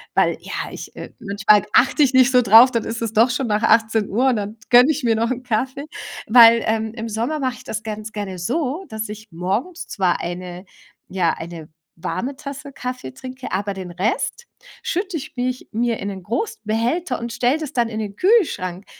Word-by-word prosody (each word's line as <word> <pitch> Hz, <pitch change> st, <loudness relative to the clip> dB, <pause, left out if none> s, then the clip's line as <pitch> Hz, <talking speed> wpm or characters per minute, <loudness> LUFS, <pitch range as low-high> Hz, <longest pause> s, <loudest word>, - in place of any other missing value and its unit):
weil -, -, +3 dB
ja, -, -, -5 dB
ich -, -, -9 dB
äh, -, -, -8 dB
manchmal 205 Hz, -1 st, +3 dB
achte 270 Hz, +4 st, +4 dB
ich 270 Hz, -1 st, +2 dB
nicht 260 Hz, 0 st, +5 dB
so 250 Hz, -1 st, +5 dB
drauf, 230 Hz, +3 st, +8 dB
dann 230 Hz, -3 st, 0 dB
ist 230 Hz, +1 st, -4 dB
es 225 Hz, -1 st, -3 dB
doch 230 Hz, +3 st, +5 dB
schon 250 Hz, 0 st, -1 dB
nach 210 Hz, +1 st, 0 dB
18:00 225 Hz, +2 st, +3 dB
und 250 Hz, -, +2 dB
dann 210 Hz, +1 st, -4 dB
gönne 250 Hz, +4 st, +7 dB
ich 305 Hz, -1 st, -3 dB
mir 230 Hz, -2 st, +3 dB
noch 230 Hz, +1 st, 0 dB
'n 255 Hz, 0 st, -3 dB
Kaffee. 260 Hz, +4 st, -2 dB, 0.4 s
Weil 230 Hz, 0 st, +8 dB
ähm, 220 Hz, 0 st, -1 dB
im 230 Hz, -1 st, -5 dB
Sommer 235 Hz, +8 st, -2 dB
mache 260 Hz, -3 st, -1 dB
ich 255 Hz, -, -14 dB
das 220 Hz, -3 st, -5 dB
ganz 215 Hz, 0 st, -6 dB
gerne 200 Hz, -4 st, -5 dB
so, 285 Hz, -, -2 dB
dass 220 Hz, -1 st, -5 dB
ich 215 Hz, +1 st, -9 dB
morgens 200 Hz, -, -3 dB
zwar 185 Hz, -4 st, 0 dB
eine 180 Hz, +1 st, -6 dB, 0.4 s
ja, 180 Hz, -3 st, +1 dB
eine 165 Hz, -2 st, -8 dB, 0.3 s
warme 250 Hz, +10 st, -3 dB
Tasse 280 Hz, 0 st, -8 dB
Kaffee 250 Hz, -, -6 dB
trinke, 255 Hz, -, -9 dB
aber 200 Hz, +1 st, -1 dB
den 185 Hz, -2 st, -7 dB
Rest 210 Hz, -, -2 dB, 0.4 s
schütte 370 Hz, 0 st, -2 dB
ich 275 Hz, -, -9 dB
mich 250 Hz, +1 st, -3 dB
mir 235 Hz, 0 st, 0 dB
in 200 Hz, -, -4 dB
'nen 190 Hz, -2 st, -6 dB
großen 425 Hz, -, -3 dB
Behälter 235 Hz, -, -1 dB
und 235 Hz, 0 st, -5 dB
stelle 250 Hz, +5 st, +2 dB
das 300 Hz, -2 st, -6 dB
dann 235 Hz, -2 st, +1 dB
in 220 Hz, -1 st, -4 dB
den 205 Hz, -2 st, -5 dB
Kühlschrank, 210 Hz, -, +1 dB
230 Hz, 200 wpm, -21 LUFS, 205-255 Hz, 0.4 s, drauf